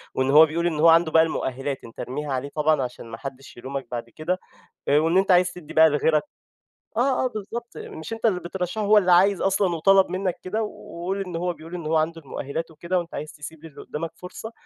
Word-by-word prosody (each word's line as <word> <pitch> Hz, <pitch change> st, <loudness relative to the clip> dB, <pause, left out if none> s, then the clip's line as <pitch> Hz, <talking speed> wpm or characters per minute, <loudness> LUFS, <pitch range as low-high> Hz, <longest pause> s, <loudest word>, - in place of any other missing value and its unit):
وإن 130 Hz, 0 st, +1 dB
هو 155 Hz, +3 st, +9 dB
بيقول 170 Hz, +2 st, -1 dB
إن 160 Hz, -3 st, -2 dB
هو 165 Hz, -, +6 dB
عنده 165 Hz, -1 st, +5 dB
بقى 160 Hz, -, +6 dB
المؤهِّلات، 135 Hz, -3 st, -3 dB
أنت 115 Hz, -, -13 dB
ارميها 140 Hz, +2 st, -4 dB
عليه 130 Hz, +2 st, -3 dB
طبعًا 155 Hz, -1 st, +2 dB
عشان 125 Hz, -1 st, -5 dB
ما 115 Hz, 0 st, -8 dB
حدّش 135 Hz, 0 st, -9 dB
يلومك 135 Hz, +1 st, -5 dB
بعد 120 Hz, -1 st, -5 dB
كده 165 Hz, +9 st, -3 dB, 0.5 s
آآ 145 Hz, -, +5 dB
وإن 165 Hz, +4 st, +3 dB
أنت 195 Hz, 0 st, +2 dB
عايز 180 Hz, 0 st, +5 dB
تدّي 175 Hz, -4 st, -11 dB
بقى 160 Hz, 0 st, +7 dB
لغيرك 150 Hz, +1 st, +2 dB, 0.8 s
آه، 260 Hz, +2 st, +2 dB
آه، -, -, +3 dB
بالضبط. 235 Hz, +1 st, -7 dB
مش 160 Hz, +7 st, -7 dB
أنت 225 Hz, -, -4 dB
اللي 195 Hz, -5 st, +3 dB
بترشّحه 180 Hz, +4 st, -4 dB
هو 210 Hz, +1 st, +6 dB
اللي 185 Hz, -3 st, +4 dB
عايز 190 Hz, +2 st, +5 dB
أصلًا 195 Hz, -2 st, +2 dB
وطلب 195 Hz, +3 st, +4 dB
منّك 185 Hz, 0 st, -2 dB
كده 215 Hz, +4 st, -1 dB
و 190 Hz, -5 st, -8 dB
وقل 195 Hz, +2 st, -1 dB
إن 180 Hz, -2 st, -6 dB
هو 175 Hz, +1 st, -1 dB
بيقول 165 Hz, +1 st, -10 dB
إن 170 Hz, -3 st, -6 dB
هو 160 Hz, +1 st, +2 dB
عنده 165 Hz, +1 st, -1 dB
المؤهِّلات 150 Hz, +3 st, -5 dB
وكده 170 Hz, +4 st, -2 dB
وأنت 170 Hz, -1 st, -7 dB
عايز 150 Hz, +1 st, -5 dB
تسيب 150 Hz, +1 st, -10 dB
للي 155 Hz, -3 st, -11 dB
قُدّامك 160 Hz, +2 st, -5 dB
فرصة 185 Hz, +5 st, -8 dB
165 Hz, 225 wpm, -24 LUFS, 150-185 Hz, 0.8 s, هو